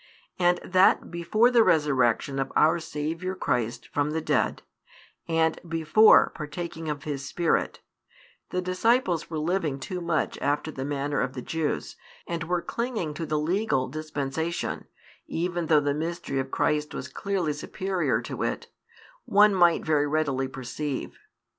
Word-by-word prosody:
And 175 0 +3
that 185 -1 +3
before 215 +8 +2
the 235 -2 +6
Resurrection 135 - +2
of 135 - -2
our 160 +2 +4
Saviour 165 +4 -4
Christ 120 -7 -2
from 145 0 0
the 160 +1 -1
dead, - - 0 0.6
and 160 -1 +1
before 165 +7 +5
partaking 160 +1 -6
of 145 -2 -4
His 140 -3 -4
Spirit, 165 +4 0 0.7
the 180 0 -2
disciples 185 -1 +1
were 160 - -4
living 155 -3 -1
too 180 +7 -5
much 170 -2 -1
after 145 +2 -1
the 130 - -5
manner 145 0 -1
of 130 - -2
the 125 - -4
Jews, 160 -2 -3 0.3
and 170 -1 -3
were 175 0 -1
clinging 230 -10 -3
to 165 +1 -5
the 155 - 0
legal 160 -3 0
dispensation, 155 +2 -3 0.4
even 175 0 -2
though 155 -1 +5
the 145 -1 0
mystery 160 -2 -3
of 135 0 -3
Christ 150 +2 0
was - - -5
clearly 190 -6 -2
superior 185 +5 -1
to - - -6
it, - - -2 0.6
one 205 +1 +5
might 175 -3 +4
very 150 -2 +2
readily 145 -3 0
perceive. 135 +2 -5
160 Hz, 145 wpm, -26 LUFS, 145-175 Hz, 0.7 s, the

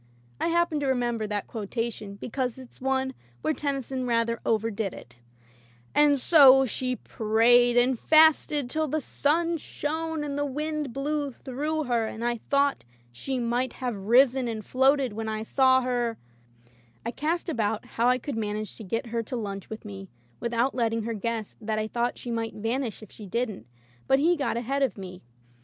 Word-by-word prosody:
I - - 0
happen 340 -2 +1
to 285 - -1
re 265 - +3
member 240 -3 -1
that 205 -1 -2
quotation 220 -1 -4
because 250 +3 -3
it's 255 -1 -13
one 265 0 0 0.3
where 315 - +1
Tennyson 270 -3 -3
rather 230 -1 +1
overdid 220 -2 0
it 120 0 -13 0.4
— - - -29 0.3
And 295 -1 +4
so 270 -3 +7
she 255 +1 -2
prayed 240 +2 +3
and 245 0 +3
fasted, 310 -3 +4
till 315 +5 -1
the 310 +3 0
sun 330 +4 0
Shone, 320 +1 -3
and 285 -1 -3
the - - +1
wind 300 0 -3
blew, 285 +3 -2
through 290 +5 -3
her, 235 -4 0
and 225 +2 -5
I 240 0 0
thought 280 0 +2 0.3
She 260 - -4
might 245 +1 -1
have 250 -3 -3
risen 245 +5 +4
and 220 -2 -4
floated 265 -2 +3
when 220 +1 -4
I 215 0 -3
saw 260 +2 +4
her 240 -2 -1 0.4
— 120 - -31
I 235 - -1
cast 320 +8 -2
about 220 -8 -1
how 235 +1 0
I 250 - +4
could 265 +1 -5
manage 215 -1 -3
to 225 - -8
get 230 +6 -2
her 230 - +1
to 230 - -6
lunch 200 -4 -5
with 220 0 -8
me 195 -2 -8 0.3
without 235 +2 0
letting 230 -2 0
her 230 +1 -2
guess 220 0 -3
that 215 0 -2
I 215 - 0
thought 235 +2 -1
she 240 - -6
might 230 -1 -3
vanish 225 +1 -3
if 215 - -13
she 210 - -10
didn't, 220 - -3 0.4
but 270 - +5
he 330 +5 +3
got 275 -6 -1
ahead 270 +4 -1
of 265 -5 +1
me. 185 -2 -8
245 Hz, 185 wpm, -27 LUFS, 220-275 Hz, 0.4 s, so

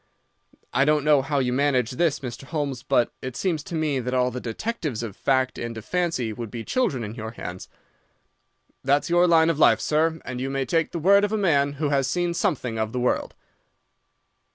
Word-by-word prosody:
I 135 +3 +4
don't 150 0 +2
know 150 -2 +4
how 145 +2 -2
you 125 -2 +1
manage 130 -3 +1
this, 150 +2 0
Mr. 125 0 -7
Holmes, 145 -4 -3
but 120 - +1
it 130 -1 -6
seems 170 -5 -1
to 175 - -6
me 155 -4 0
that 125 +1 -2
all 125 0 +2
the 125 +1 -5
detectives 140 - -3
of 105 -4 -6
fact 130 -1 0
and 115 -1 -5
of 110 - -8
fancy 165 -11 -1
would 115 0 -6
be 115 +1 -6
children 140 - 0
in 105 0 -5
your 110 -1 -7
hands. 90 -5 -7 1.1
That's 140 +4 +1
your 175 +1 +5
line 165 -1 +5
of 155 - -4
life, - - +5
sir, 160 +1 +1
and 125 -1 -5
you 135 - -2
may 135 0 -1
take 165 +2 0
the - - -4
word 200 +5 +5
of 205 - 0
a 220 - +1
man 145 -8 +2
who 145 +1 -2
has 135 -2 +1
seen 175 +2 0
something 125 -8 -1
of 110 +1 -2
the 125 - -1
world. 125 - -1
140 Hz, 210 wpm, -24 LUFS, 125-160 Hz, 1.1 s, your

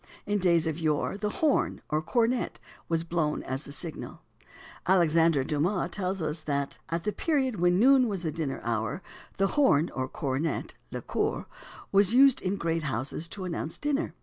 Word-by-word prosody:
In 205 0 0
days 170 -3 +3
of 160 0 -2
yore 155 +2 0
the 210 +1 -2
horn, 295 +6 +1
or 155 +1 +1
cornet, 235 +8 0 0.3
was 165 -1 +1
blown 165 -3 -1
as 130 +3 -2
the - - -7
signal. 160 +2 -4 0.7
Alexander 165 -5 +4
Dumas 170 +6 0
tells 185 -1 -2
us 155 +1 -2
that 140 -1 -2
"at 165 0 -2
the 210 - 0
period 265 - 0
when 175 +1 +3
noon 260 +3 +5
was 195 -4 -3
the 160 - -1
dinner 150 -3 -3
hour, 115 - -2 0.3
the 195 0 +2
horn 175 - +3
or 130 -1 -2
cornet 135 +4 -2 0.2
(le - - -6
cor) - - -1 0.5
was 200 +3 +4
used 270 0 +6
in 190 +1 -1
great 165 -3 -1
houses 140 +3 -2
to 190 +3 -7
announce 165 -2 -4
dinner. 295 +1 -1
170 Hz, 175 wpm, -28 LUFS, 155-205 Hz, 0.7 s, used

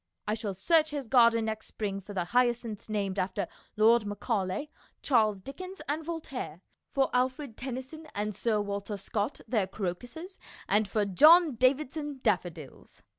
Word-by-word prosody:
I 210 - +1
shall 215 -3 -3
search 315 - +3
his 290 -3 -4
garden 230 -2 +5
next 220 0 -4
spring 200 -2 -4
for 205 +1 -10
the 180 - +1
hyacinths 240 +1 0
named 200 -2 -1
after 185 0 -1 0.3
Lord 225 +2 +5
Macaulay, 205 +5 -2 0.3
Charles 215 -7 +3
Dickens, 370 - -8
and 300 +3 -1
Voltaire, 285 - -5 0.3
for 270 -1 +1
Alfred 255 0 0
Tennyson 260 +5 -6
and 210 +1 -1
Sir 215 +2 0
Walter 200 0 -3
Scott 210 +5 -3
their 215 -5 +1
crocuses, 245 - -6 0.3
and 210 0 +3
for 210 +1 0
John 310 - +7
Davidson 275 +3 0
daffodils. 175 - -3
225 Hz, 145 wpm, -29 LUFS, 200-275 Hz, 0.3 s, John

